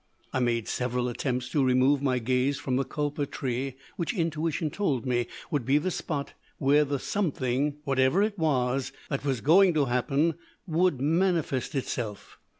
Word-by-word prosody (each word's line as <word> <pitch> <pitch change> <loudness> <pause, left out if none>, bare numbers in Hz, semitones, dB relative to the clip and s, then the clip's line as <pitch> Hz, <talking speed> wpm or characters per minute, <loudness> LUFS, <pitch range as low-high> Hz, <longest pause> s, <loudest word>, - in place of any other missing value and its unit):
"I 130 - +1
made 120 -3 0
several 125 0 -1
attempts 125 0 -2
to 145 - +2
remove 130 +2 +3
my 130 -3 +1
gaze 130 +3 +1
from 130 -2 -2
the 135 - +2
kulpa 145 +2 -2
tree, 130 0 -3 0.2
which 175 +7 -2
intuition 165 -2 -1
told 145 - -1
me 120 -2 0 0.2
would 145 -4 0
be 135 +5 +3
the 185 +5 -1
spot 145 -4 -3 0.2
where 145 +1 +4
the 140 -1 -1
something, 145 -5 -1
whatever 135 +6 +3
it 210 -1 -1
was, 135 -6 0 0.2
that 140 - -1
was 135 -5 -1
going 180 +3 +5
to 145 -2 +3
happen 140 +6 +1 0.3
would 175 -4 +1
manifest 160 -2 +1
itself. 115 -6 -4
140 Hz, 160 wpm, -28 LUFS, 125-155 Hz, 0.3 s, going